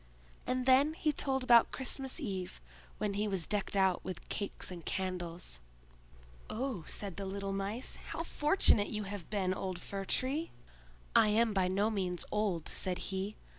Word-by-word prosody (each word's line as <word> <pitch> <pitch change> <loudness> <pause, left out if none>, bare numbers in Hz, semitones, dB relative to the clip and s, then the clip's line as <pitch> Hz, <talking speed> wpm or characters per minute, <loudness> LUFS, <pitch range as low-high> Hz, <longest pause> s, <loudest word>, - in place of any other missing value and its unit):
And 255 0 0
then 275 +4 +5
he 310 -2 +1
told 265 -2 0
about 235 -2 +6
Christmas 265 +2 -1
Eve, 190 - -4 0.4
when 210 -1 -1
he 205 +2 0
was 190 -5 0
decked 205 -1 +1
out 190 -2 +3
with 185 -1 -6
cakes 200 -2 -2
and 175 -2 -7
candles. 175 - -3 0.9
"Oh," 240 -6 -3
said 200 -4 -3
the 200 - -4
little 195 0 -3
Mice, 200 +5 -3
"how 330 - -3
fortunate 295 - +3
you 210 -1 -2
have 200 -3 -6
been, 190 -3 0
old 185 -1 -4
Fir 195 +1 -5
tree!" 280 - 0 0.7
"I - - +7
am 220 +1 +3
by 190 -2 +2
no 200 +4 +1
means 185 -4 -1
old," 200 -7 0
said 185 -1 0 0.2
he. 195 +2 -2
200 Hz, 165 wpm, -33 LUFS, 185-245 Hz, 0.9 s, I